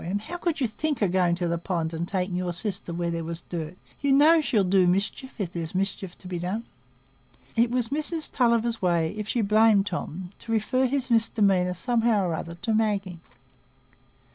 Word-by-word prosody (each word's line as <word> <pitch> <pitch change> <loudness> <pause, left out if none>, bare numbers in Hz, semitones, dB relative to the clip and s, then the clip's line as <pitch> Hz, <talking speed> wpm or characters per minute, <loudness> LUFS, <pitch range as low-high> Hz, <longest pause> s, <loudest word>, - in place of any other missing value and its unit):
And 195 +4 -2
how 345 +11 -6
could 340 -3 -1
you 265 - +2
think 260 +2 -2
o' - - +4
going 180 -1 +2
to 175 0 -2
the 170 0 -1
pond, 165 -2 -2
and 165 +1 -3
taking 185 -1 -2
your 180 -1 -2
sister 185 0 -4
where 170 0 -2
there 165 0 -3
was 165 +1 -5
dirt? 165 0 -5 0.2
You 280 -1 +2
know 310 +4 +6
she'll 220 -8 +2
do 185 0 +3
mischief 200 +8 -1
if 190 -6 -4
there's 165 0 -5
mischief 190 -1 -2
to 185 - -12
be 180 -1 -4
done." 190 +6 -3 0.9
It 235 +1 +3
was 245 -2 0
Mrs 310 +2 0
Tulliver's 235 -2 +1
way, 170 -3 +1
if 210 -1 -5
she 240 - 0
blamed 215 -1 +4
Tom, 180 -1 -5
to 230 - -7
refer 255 +4 +1
his 260 -1 -2
misdemeanour, 200 -5 +3
somehow 230 -1 +1
or 170 - -1
other, 170 +1 -5
to 225 0 0
Maggie. 200 -5 0
200 Hz, 195 wpm, -26 LUFS, 175-235 Hz, 0.9 s, know